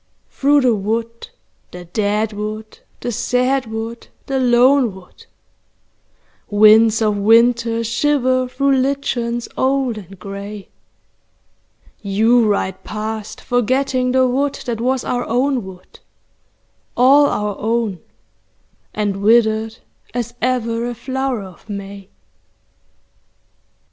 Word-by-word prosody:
Through 285 +1 +3
the 250 -3 +3
wood, 225 +3 -3 0.4
the 180 0 -10
dead 210 +4 -1
wood, 215 +1 -6 0.2
the 240 - -3
sad 250 +3 0
wood, 225 +1 -6 0.2
the 270 -1 -1
lone 250 -2 +3
wood, 185 -1 -16 1.2
Winds 215 +1 +5
of 210 -1 +1
winter 230 +2 +3
shiver 255 +1 +1
through 275 +2 +1
lichens 255 -3 -1
old 260 -4 0
and 195 0 -13
grey, 200 +2 -8 1.3
You 220 +4 +3
ride 200 -2 -1
past 215 0 -5
forgetting 255 +1 0
the 260 0 +3
wood 275 +3 0
that 230 -2 -3
was 255 +1 0
our 245 0 -2
own 255 +1 0
wood, 185 -1 -13 1.0
All 275 +4 +6
our 210 -5 -2
own 220 -4 -1 1.0
and 205 -2 -1
withered 220 0 +2 0.4
as 240 -1 -3
ever 235 -2 -1
a 240 - -5
flower 260 -1 -3
of 190 +3 -14
May. 200 -1 -8
230 Hz, 110 wpm, -18 LUFS, 210-255 Hz, 1.3 s, All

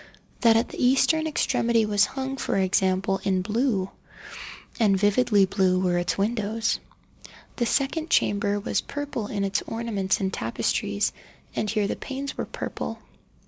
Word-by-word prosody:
That 230 -2 +5
at 230 - 0
the - - -4
eastern 315 +5 +3
extremity 235 -6 +1
was 205 -1 +3
hung, 265 +2 -4
for 200 - -1
example 190 +1 +1
in 185 -2 +1
blue—and 210 -1 -2
vividly 205 0 +3
blue 185 -1 +2
were 180 -1 +1
its 175 - -1
windows. 220 +2 0 0.8
The 240 - +1
second 310 +6 0
chamber 205 -4 +2
was 205 - -1
purple 285 -7 -4
in 200 -2 -2
its 195 0 0
ornaments 220 -4 -1
and 190 -1 -1
tapestries, 115 +1 -1 0.4
and 210 - -1
here 210 -1 +1
the - - -2
panes 275 0 -5
were - - -4
purple. - - -5
210 Hz, 140 wpm, -25 LUFS, 195-240 Hz, 0.8 s, That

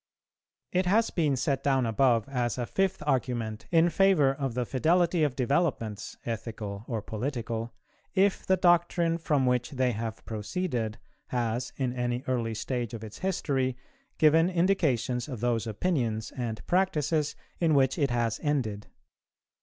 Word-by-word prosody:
It 180 0 +1
has 220 +4 +3
been 150 -5 +1
set 135 +1 -1
down 135 -3 +2
above 115 0 +2
as 125 -4 -1
a 120 - -1
fifth 190 +2 0
argument 120 -5 -1
in 170 0 +4
favour 180 -9 +4
of 135 -3 -3
the 125 -1 0
fidelity 170 +6 +2
of 145 -4 +1
developments, 130 - -1
ethical 110 -3 -5
or 115 -4 -3
political, 115 -1 -4 0.4
if 195 0 +3
the 190 - +2
doctrine 175 -1 +3
from 150 -5 +1
which 125 -1 +1
they 130 -3 +1
have 115 0 -5
proceeded 115 - -3 0.3
has, 120 0 -2
in 130 -3 -1
any 125 0 -2
early 115 -3 -1
stage 120 +1 -3
of 110 - -8
its 110 -1 -9
history, 135 -9 -1 0.4
given 160 +2 +5
indications 150 - +1
of 130 -6 -6
those 115 -1 0
opinions 110 - -1
and 115 -4 -4
practices 160 -5 +1 0.2
in 160 -3 +3
which 135 +2 +3
it 140 -2 +2
has 115 -2 0
ended. 120 -9 -1
130 Hz, 145 wpm, -28 LUFS, 115-160 Hz, 0.4 s, given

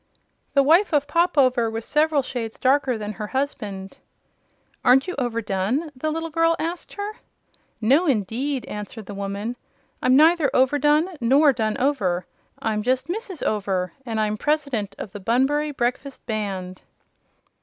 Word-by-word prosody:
The 275 - +6
wife 330 +7 +4
of 290 -1 +3
Pop 340 0 +1
Over 255 -4 +4
was 225 0 -5
several 300 -1 +2
shades 230 -4 -5
darker 265 -2 +2
than 210 -1 -4
her 210 0 -6
husband. 210 -8 -4 0.9
"Aren't 265 +5 +5
you 365 - -2
overdone?" 230 - -1
the 310 +5 -2
little 325 +1 -3
girl 330 +1 +3
asked 335 +2 -4
her. 415 +1 -5 0.6
"No 275 +11 +3
indeed," 250 +3 -1
answered 210 +1 -7
the 205 - -8
woman. 200 +4 -4 0.4
"I'm 255 - +4
neither 315 0 +5
overdone 295 +5 +3
nor 275 +5 +5
done 220 -2 -1
over; 190 -11 0 0.3
I'm 215 -1 -1
just 255 +6 0
Mrs. 390 -3 -4
Over, 190 -4 -1
and 225 -3 -3
I'm 215 0 0
the - - -17
President 280 -10 -1
of 195 - -7
the 205 - -8
Bunbury 265 +8 +1
Breakfast 265 0 -3
Band." 195 -4 -4
255 Hz, 150 wpm, -23 LUFS, 215-295 Hz, 0.9 s, The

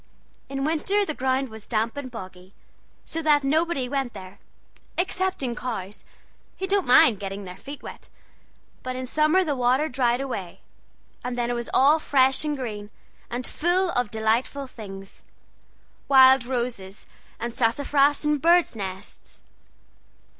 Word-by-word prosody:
In 270 0 -3
winter 355 +7 +1
the 310 - -3
ground 265 0 -1
was 220 -1 -12
damp 225 +2 -1
and 285 -2 -6
boggy, 185 -4 -11 0.5
so 325 - -3
that 300 -2 +3
nobody 305 -1 +1
went 270 -2 -2
there, 190 0 -11 0.6
excepting 360 -8 -1
cows, 210 -6 -6 0.5
who 380 - -3
don't 390 -3 0
mind 235 -4 +6
getting 195 0 -5
their 180 -1 -8
feet 280 +9 -10
wet; - - -10 0.7
but 255 0 -5
in 255 0 -4
summer 310 +7 +3
the 300 -5 -1
water 255 +4 +2
dried 245 -3 +1
away, 225 -10 -5 0.6
and 250 0 -4
then 240 0 -1
it - - 0
was 235 -1 -4
all 290 +4 +5
fresh 265 -2 +3
and 300 -1 -2
green, 210 -5 -6 0.4
and 245 +1 -4
full 355 +2 +1
of 245 -6 0
delightful 225 +6 -1
things 195 -6 -11 0.9
wild 265 -2 +7
roses, 235 -6 -4 0.3
and 235 0 -4
sassafras, 280 +5 +2
and 300 -2 +1
birds' 340 -4 +4
nests. 190 -3 -8
255 Hz, 145 wpm, -25 LUFS, 225-295 Hz, 0.9 s, wild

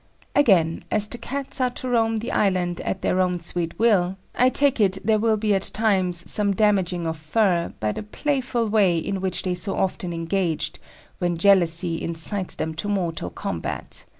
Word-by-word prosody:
Again, 180 - +3
as 210 -1 +2
the 240 - -3
Cats 275 +2 -3
are 250 - +2
to 250 +1 -7
roam 225 -2 +1
the 230 +3 -4
island 180 -4 0
at 190 - -4
their 185 - +1
"own 180 -1 0
sweet 170 0 -3
will," 195 -5 +2 0.2
I 250 - +3
take 280 -1 +2
it 195 -2 +3
there 220 0 +3
will 220 0 +2
be 210 -1 +1
at 195 -1 +1
times 185 -5 +1
some 200 -2 +4
"damaging 185 -5 +1
of 160 0 -3
fur" 175 +1 +1
by 105 0 -1
the - - -5
playful 245 +1 -2
way 200 -5 +3
in 190 +4 -3
which 190 -1 -2
they 185 - -1
so 180 +2 -2
often 180 -2 -2
engage, 165 0 -1 0.5
when 175 -1 -1
jealousy 170 -2 +3
incites 170 +4 0
them 160 - -3
to 205 - -3
mortal 170 - -2
combat. - - -4
190 Hz, 180 wpm, -23 LUFS, 175-220 Hz, 0.5 s, some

